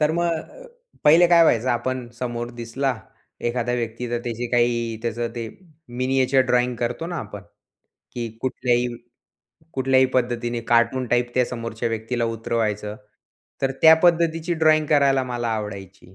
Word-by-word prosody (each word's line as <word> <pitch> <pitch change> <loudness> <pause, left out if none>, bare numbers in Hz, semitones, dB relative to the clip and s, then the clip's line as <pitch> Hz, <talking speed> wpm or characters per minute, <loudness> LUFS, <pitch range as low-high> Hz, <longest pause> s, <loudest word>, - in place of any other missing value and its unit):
तर 150 +1 +2
मग 170 +1 0
अ, - - -8 0.4
पहिले 165 +4 +7
काय 170 -1 +6
व्हायचं 125 -5 +3
आपण 125 +1 -2
समोर 120 -1 -4
दिसला, 130 +3 -1 0.5
एखाद्या 120 0 -1
व्यक्ती, 120 0 -4
तर 120 - 0
त्याची 120 0 -3
काही 120 -2 +1
त्याचं 115 0 -2
ते 115 -2 -4 0.4
मिनिएचर 130 +2 +1
ड्रॉइंग 125 0 +2
करतो 120 +7 -3
ना, 175 - -4
आपण, 105 - -7 0.7
की 120 -1 -4
कुठल्याही 125 -1 0 0.9
कुठल्याही 130 0 +3
पद्धतीने 120 -1 0
कार्टून 120 +2 +2
टाइप 120 0 +1
त्या 125 - +3
समोरच्या 115 -1 -4
व्यक्तीला 115 +2 -2
उतरवायचं. 110 -2 -2 0.7
तर 135 - +2
त्या 160 0 +9
पद्धतीची 170 0 +2
ड्रॉइंग 155 -1 +3
करायला 140 -3 +3
मला 120 -2 -3
आवडायची. 100 -3 -8
120 Hz, 140 wpm, -23 LUFS, 115-135 Hz, 0.9 s, त्या